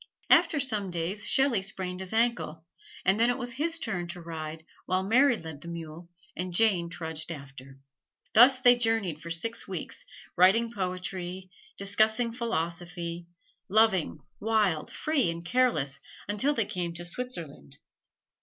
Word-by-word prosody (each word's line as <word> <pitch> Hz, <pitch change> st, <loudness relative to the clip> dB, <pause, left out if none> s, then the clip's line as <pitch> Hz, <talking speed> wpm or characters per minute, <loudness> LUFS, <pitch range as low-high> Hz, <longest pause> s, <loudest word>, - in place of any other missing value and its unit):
After 300 Hz, -, +5 dB
some 215 Hz, -8 st, -1 dB
days 175 Hz, +4 st, -2 dB
Shelley 265 Hz, -7 st, +3 dB
sprained 185 Hz, -2 st, -4 dB
his 190 Hz, -1 st, -5 dB
ankle, 220 Hz, -9 st, 0 dB, 0.4 s
and 190 Hz, +3 st, +3 dB
then 235 Hz, +1 st, +4 dB
it 245 Hz, -, +1 dB
was 245 Hz, -2 st, -4 dB
his 325 Hz, +7 st, -1 dB
turn 175 Hz, -, -3 dB
to 175 Hz, +1 st, -6 dB
ride 160 Hz, -1 st, -7 dB, 0.2 s
while 185 Hz, +1 st, +1 dB
Mary 245 Hz, +5 st, +4 dB
led 160 Hz, -5 st, -9 dB
the 170 Hz, -, -10 dB
mule 170 Hz, 0 st, -8 dB, 0.3 s
and 180 Hz, +1 st, -4 dB
Jane 185 Hz, -5 st, +3 dB
trudged 160 Hz, -1 st, -4 dB
after. 135 Hz, -3 st, -10 dB, 0.6 s
Thus 255 Hz, +3 st, +7 dB
they 245 Hz, -1 st, +7 dB
journeyed 225 Hz, -9 st, 0 dB
for 170 Hz, -, -8 dB
six 225 Hz, +8 st, -3 dB
weeks, -, -, -5 dB, 0.3 s
writing 210 Hz, +6 st, +5 dB
poetry, 185 Hz, -1 st, -4 dB, 0.3 s
discussing 220 Hz, +4 st, +2 dB
philosophy; 170 Hz, -5 st, -3 dB, 0.4 s
loving, 195 Hz, -7 st, +3 dB, 0.2 s
wild, 210 Hz, -7 st, +1 dB
free 290 Hz, -, +1 dB
and 170 Hz, +1 st, -5 dB
careless, 175 Hz, -, +1 dB, 0.3 s
until 235 Hz, +9 st, +1 dB
they 225 Hz, -, +1 dB
came 180 Hz, -4 st, -4 dB
to 175 Hz, +1 st, -4 dB
Switzerland. 170 Hz, -, -4 dB
185 Hz, 145 wpm, -28 LUFS, 170-230 Hz, 0.6 s, Thus